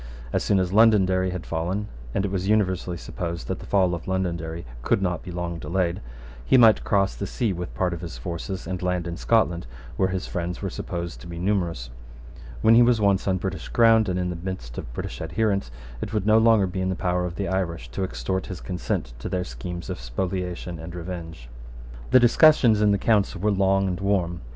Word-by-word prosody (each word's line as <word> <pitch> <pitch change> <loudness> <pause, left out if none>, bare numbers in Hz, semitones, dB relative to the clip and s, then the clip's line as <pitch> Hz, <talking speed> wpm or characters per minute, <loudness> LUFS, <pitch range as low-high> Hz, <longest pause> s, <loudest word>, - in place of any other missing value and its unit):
As - - +1
soon 100 - +2
as 90 0 -1
Londonderry 95 -4 +4
had 90 -1 -5
fallen, 90 +6 -2 0.3
and 100 - +1
it 95 - -3
was 95 -1 -2
universally 95 -4 +1
supposed 85 -4 -5
that - - -3
the - - -10
fall 95 -3 +3
of 85 -1 -5
Londonderry 85 -3 -2 0.2
could - - +2
not 90 -2 -1
be - - -9
long 85 -1 -4
delayed, 85 0 -1 0.4
he 130 - +4
might 115 -3 +6
cross 100 -1 +2
the 100 - -5
sea 115 -6 -1
with 90 0 -6
part 90 -2 0
of 85 - -6
his 80 -8 -7
forces, 85 +8 -5
and 90 -1 -4
land 90 -2 -1
in 85 0 -4
Scotland, 85 - +1 0.3
where 95 - +2
his 95 0 -3
friends 90 0 -4
were 95 -2 -3
supposed 85 -9 -5
to - - -10
be 85 -1 -7
numerous. 85 -10 -1 0.7
When 110 - +7
he 115 - +7
was 120 -1 +4
once 100 -2 +2
on 95 -1 +2
British - - -4
ground, 115 -3 +5
and 90 - -1
in 90 -1 -1
the - - -4
midst 85 -9 -6
of - - -8
British - - -6
adherents, 100 - 0 0.3
it 105 - -5
would 105 -2 0
no 110 +1 +5
longer 110 -3 +5
be 95 0 -3
in 95 - 0
the 95 - -1
power 90 0 0
of 85 - -7
the 100 +2 -2
Irish 85 -8 -2
to 95 - -3
extort 95 0 -3
his 95 - -6
consent 90 -9 -3
to - - -5
their 90 -1 -1
schemes 85 +7 -7
of - - -5
spoliation 90 +7 -4
and 85 +2 -8
revenge. 85 -7 -7 0.6
The 130 - +7
discussions 120 -3 +5
in 105 -1 +4
the 100 - +3
Council 100 -2 +1
were 105 +3 +1
long 95 0 +2
and 90 -1 -2
warm. 95 -4 0
90 Hz, 215 wpm, -25 LUFS, 85-100 Hz, 0.7 s, When